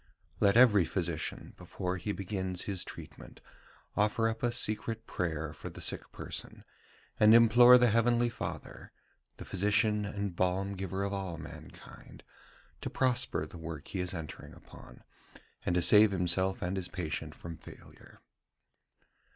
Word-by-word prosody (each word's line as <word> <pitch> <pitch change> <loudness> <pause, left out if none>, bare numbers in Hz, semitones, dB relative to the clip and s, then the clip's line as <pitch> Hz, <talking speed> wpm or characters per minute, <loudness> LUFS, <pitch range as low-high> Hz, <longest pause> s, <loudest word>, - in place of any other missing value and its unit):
"Let 100 +1 +4
every 110 -6 +6
physician, 85 -2 -4
before 90 +1 -4
he 105 +4 -3
begins 95 -1 -3
his 95 -3 -2
treatment, - - -11 0.6
offer 105 +2 +2
up 115 0 -3
a 120 - +1
secret 115 0 -1
prayer 80 -5 -3
for - - -8
the - - -11
sick - - -2
person, - - -6 0.6
and 110 +1 +7
implore 120 +2 +8
the 125 -2 +3
heavenly 120 +1 +3
Father, 115 - -7 0.5
the - - -9
Physician 105 +2 +1
and 100 -2 -4
Balm 95 +2 0
giver 95 0 -4
of 100 0 -2
all 95 -4 -4
mankind, 80 - -12 0.6
to - - -4
prosper 130 -1 0
the 85 - -11
work 80 -2 -7
he 95 - -4
is 90 +1 -2
entering 80 -3 -8
upon, 60 - -15 0.6
and 90 - +1
to 90 - +2
save 105 +3 +7
himself 95 0 0
and 90 +2 -2
his 90 -2 -2
patient 85 -4 -5
from 85 -1 -8
failure." - - -16
95 Hz, 145 wpm, -31 LUFS, 90-110 Hz, 0.6 s, implore